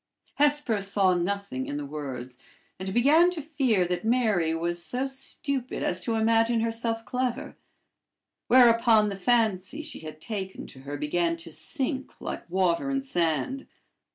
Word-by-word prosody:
Hesper 290 -7 +2
saw 195 -1 +2
nothing 180 -6 -2
in 145 - -3
the 145 - -4
words, 130 -4 -7 0.4
and 190 0 -4
began 295 - +5
to 360 -2 -5
fear 270 - +1
that 180 +2 -2
Mary 215 -9 +2
was 170 +1 -2
so 250 +8 -2
stupid 270 -1 -3
as 180 - 0
to 225 +5 -2
imagine 225 +1 +3
herself 230 0 -1
clever; 255 +2 -3 0.9
whereupon 230 -3 +5
the 200 - -4
fancy 220 +5 +1
she 305 - -8
had 155 -1 -9
taken 190 0 -5
to 130 - -13
her 140 +2 -6
began 165 +3 0
to 165 0 -7
sink 270 - -2
like - - -6
water 185 +6 +1
in 275 0 -1
sand. 175 - -1
215 Hz, 150 wpm, -27 LUFS, 175-255 Hz, 0.9 s, began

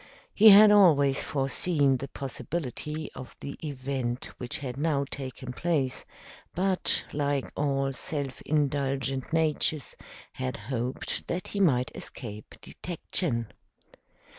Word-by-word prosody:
He 220 +1 +8
had 210 +1 +10
always 150 -9 +5
foreseen 140 0 +1
the 135 - -5
possibility 150 +2 -5
of 130 - -9
the 140 - -6
event 130 -4 -3
which 125 - -3
had 130 -4 -5
now 145 -1 0
taken 130 -2 -6
place, 145 -4 -1 0.5
but, 185 +1 +1
like 145 -2 -1
all 135 -1 0
self 140 0 -4
indulgent 135 -3 -1
natures, 155 -3 0 0.4
had 65 - -3
hoped 125 +3 -3
that 180 +2 -3
he 200 - -3
might 130 -10 +3
escape 105 -4 -8
detection. 155 - -3
140 Hz, 115 wpm, -28 LUFS, 130-155 Hz, 0.5 s, had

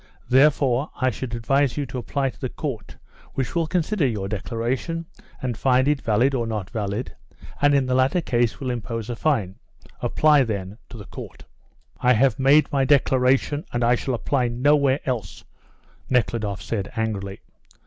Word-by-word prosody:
Therefore, 135 0 +3
I 130 -1 +2
should 120 +1 -5
advise 135 +4 +1
you 145 - -1
to 125 0 -5
apply 135 +3 -1
to - - -22
the 130 - -2
Court, 120 -9 -6 0.4
which 130 -2 -2
will 165 -2 0
consider 175 -1 +1
your 105 -5 -3
declaration, 120 - -3 0.4
and 125 -2 -1
find 130 +2 +2
it 145 -2 +1
valid 115 +5 +2
or 120 -3 -1
not 105 -3 -4
valid, 105 +2 -3 0.5
and 145 0 +5
in 135 -1 +3
the 130 - -1
latter 130 +7 +3
case 120 -7 0
will 130 -2 -2
impose 115 -1 -4
a - - -3
fine. 115 -10 -1 0.4
Apply, 150 -3 +4
then, 100 -2 -4
to 115 - -10
the 105 - -9
Court." - - -10 0.5
"I 125 0 +4
have 125 0 +2
made 140 +3 +4
my 140 -2 +2
declaration, 135 +1 +2
and 120 0 -1 0.2
shall 130 - -2
apply 125 +1 0
nowhere 140 +3 +2
else," 115 -8 -4 0.7
Nekhludoff 110 -6 0
said, 105 -2 -3
angrily. 100 -3 -3
125 Hz, 165 wpm, -23 LUFS, 115-140 Hz, 0.7 s, and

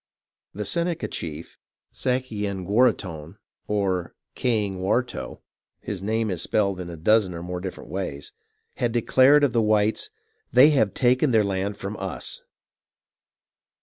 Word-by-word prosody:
The 105 +1 -3
Seneca 170 -1 -1
chief 80 0 -6 0.3
Sayenguaraghton, 105 -7 -1 0.3
or 95 -4 -1 0.2
Kayingwaurto 105 0 -1 0.4
(his 95 -3 -5
name 110 +1 0
is 90 -2 -2
spelled 100 -2 0
in 90 -1 -6
a 85 - -7
dozen 95 +2 +3
or 85 - -6
more 90 0 -4
different 95 -5 -7
ways), 90 -7 -5 0.4
had 120 -2 0
declared 130 +5 +5
of 135 -6 +2
the 115 - +3
whites 105 0 +1 0.2
— - - -46
"they 130 +5 +8
have 110 -9 +2
taken 130 +3 +3
their 110 -3 +4
land 100 +1 -2
from 100 +2 -5
us." - - -4
105 Hz, 130 wpm, -24 LUFS, 95-120 Hz, 0.4 s, they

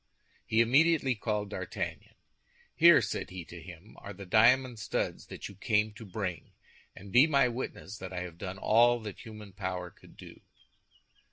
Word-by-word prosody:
He 110 0 +3
immediately 135 +3 +3
called 105 -2 -3
D'Artagnan. 90 -4 -5 0.6
"Here," 165 -6 +7
said 105 - -4
he 90 -2 -8
to 85 0 -11
him, 90 +4 -13
"are 100 - -8
the 100 0 -10
diamond 120 +4 +4
studs 105 - -3
that - - -8
you - - -11
came 105 +2 0
to 110 +2 -11
bring; 95 -4 -5 0.4
and 100 +1 -12
be 125 +8 +6
my 140 -4 +4
witness 115 -4 -6
that 95 0 -7
I 90 -1 -4
have 85 -2 -8
done 95 -1 -6
all 120 +4 +4
that 105 -4 -8
human 105 -3 -11
power 90 -2 -4
could - - -20
do." - - -13
105 Hz, 170 wpm, -30 LUFS, 95-120 Hz, 0.6 s, Here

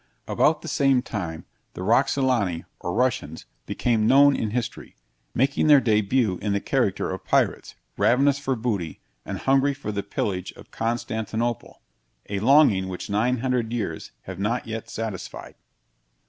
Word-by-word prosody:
About - - +2
the - - -7
same 135 -3 +2
time, 85 -10 -5 0.3
the 90 - -5
Roxolani 120 -5 +1
or 90 - -4
Russians, 115 - -1 0.2
became 110 -3 +1
known 140 +2 +6
in 110 - -2
history, 115 0 -4 0.4
making 140 +4 +2
their 145 -2 +8
debut 110 -3 +1
in 105 0 -1
the 100 - +1
character - - 0
of - - -6
pirates, - - 0 0.2
ravenous 140 +3 +3
for 135 -2 -1
booty, 105 - -3 0.3
and - - -4
hungry 135 +1 +2
for 135 -6 -5
the 100 -1 -2
pillage 95 -2 -3
of - - -16
Constantinople 115 0 -3 0.5
a 100 - -1
longing 115 -5 +4
which 95 +1 -6
900 120 +2 0
years 100 -9 -4
have 95 -1 -8
not 115 +5 -1
yet 110 0 -6
satisfied. 110 -5 -6
115 Hz, 145 wpm, -24 LUFS, 100-130 Hz, 0.5 s, their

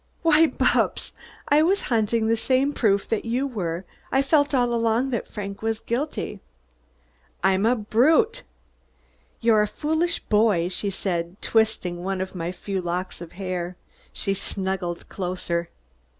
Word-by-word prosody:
"Why, 325 0 +6
Bupps, - - +1 0.4
I 290 +2 +6
was 380 +5 +3
hunting 225 -1 +1
the 225 +1 +3
same 265 +5 +1
proof 200 -6 +2
that 225 - 0
you 245 +4 0
were. 185 -8 -3 0.3
I 270 +1 +3
felt 285 +1 +3
all 245 -2 +2
along 230 +3 +1
that 235 - -2
Frank 200 -1 -6
was 225 0 -1
guilty." 240 -4 -3 1.0
"I'm 195 +3 +3
a 245 - +4
brute!" 310 - +3 1.0
"You're 225 -2 +5
a 210 - +2
foolish 320 +7 0
boy," 210 -5 +2
she 200 +2 -1
said, 180 -1 -3
twisting 215 -6 +1
one 190 0 -2
of 190 0 -4
my 175 -1 -3
few 190 +1 -4
locks 180 +1 -3
of 170 0 -9
hair. 180 -1 -4 0.3
She 195 - -1
snuggled 190 -3 -3
closer. 175 -2 -3
215 Hz, 145 wpm, -24 LUFS, 185-250 Hz, 1.0 s, Why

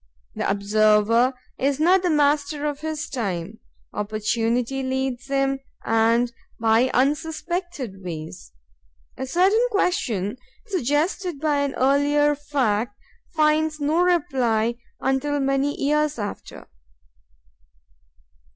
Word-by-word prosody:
The - - -2
observer 215 +4 +3 0.2
is 275 +1 +1
not 360 +4 +4
master 295 0 +1
of 290 -1 -2
his 315 0 -4
time; 200 -4 -4 0.3
opportunity 225 +5 -1
leads 260 -1 -2
him 275 0 0 0.3
and 230 +2 +2 0.3
by 225 +3 +3
unsuspected 300 - -2
ways. 160 - -7 0.6
A 265 - -5
certain 390 - +3
question 250 - 0 0.3
suggested 345 - -1
by 300 -1 +1
an 285 -1 -1
earlier 290 +2 +3
fact 245 -7 -1 0.4
finds 305 0 +2
no 305 +4 +1
reply 250 -10 +1 0.2
until 270 +2 0
many 275 +1 0
years 300 0 +1
after. 205 -2 -7
275 Hz, 95 wpm, -23 LUFS, 230-300 Hz, 0.6 s, not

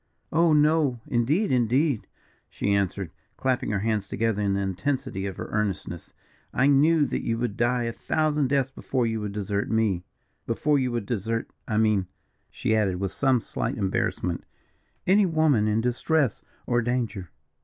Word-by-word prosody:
"Oh! 165 +1 +4
no, 150 -4 +3
indeed 145 - +1
indeed!" 125 +1 +2 0.4
she 100 - -1
answered, 100 -3 -1 0.3
clapping 130 -1 0
her 105 -2 0
hands 105 -2 0
together 110 +1 0
in 100 -1 +1
the - - 0
intensity 100 0 -2
of 95 - -6
her - - -4
earnestness; 100 -5 -3 0.4
"I 130 - +2
knew 145 +2 +5
that - - -2
you 115 - -1
would 115 -3 -2
die 120 +1 +1
a 115 - -1
thousand 150 0 0
deaths 135 -1 +1
before 130 -2 -1
you 110 -1 -1
would 105 -1 -3
desert 100 0 -2
me 110 -6 +1 0.4
before 150 -2 +2
you 130 -2 0
would 120 -3 -2
desert, 115 +1 -2 0.2
I 110 - 0
mean," 105 -4 +2 0.4
she 110 - 0
added, 100 -4 +1
with 95 -1 -2
some 130 -4 +2
slight - - -3
embarrassment, 95 -3 -1 0.6
"any 195 +1 +4
woman 155 -10 +3
in 110 +1 +2
distress 125 +2 +1 0.2
or 120 0 +2
danger." 115 -7 -2
115 Hz, 165 wpm, -26 LUFS, 105-140 Hz, 0.6 s, knew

